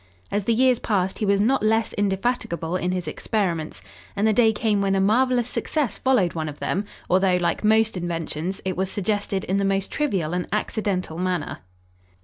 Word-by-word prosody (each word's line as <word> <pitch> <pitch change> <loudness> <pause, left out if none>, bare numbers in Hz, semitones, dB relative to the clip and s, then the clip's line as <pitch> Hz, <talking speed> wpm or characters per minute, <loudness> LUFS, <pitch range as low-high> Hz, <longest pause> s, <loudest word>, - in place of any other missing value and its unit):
As 205 -1 -1
the 230 - +3
years 255 0 +4
passed 190 -3 -1
he 210 - 0
was 200 0 +3
not 255 +6 +2
less 220 +1 +1
indefatigable 195 -4 -1
in 180 -1 -1
his 180 -3 -3
experiments, 170 -2 -2 0.3
and 205 +1 +1
the 220 - +3
day 225 0 +5
came 210 -1 0
when 195 0 +1
a - - +2
marvelous 245 +4 +2
success 285 0 -2
followed 245 -10 +2
one 155 -2 -3
of 145 - -9
them, 195 +7 -2 0.2
although, 185 0 +3
like 175 +3 -1
most 220 0 +3
inventions, 170 0 -3
it 185 -1 -1
was 190 +1 -1
suggested 200 -1 -1
in 190 - 0
the 200 - +1
most 195 0 0
trivial 190 - -1
and 180 0 -2
accidental 200 -5 -2
manner. 180 -4 -2
195 Hz, 185 wpm, -24 LUFS, 180-220 Hz, 0.3 s, day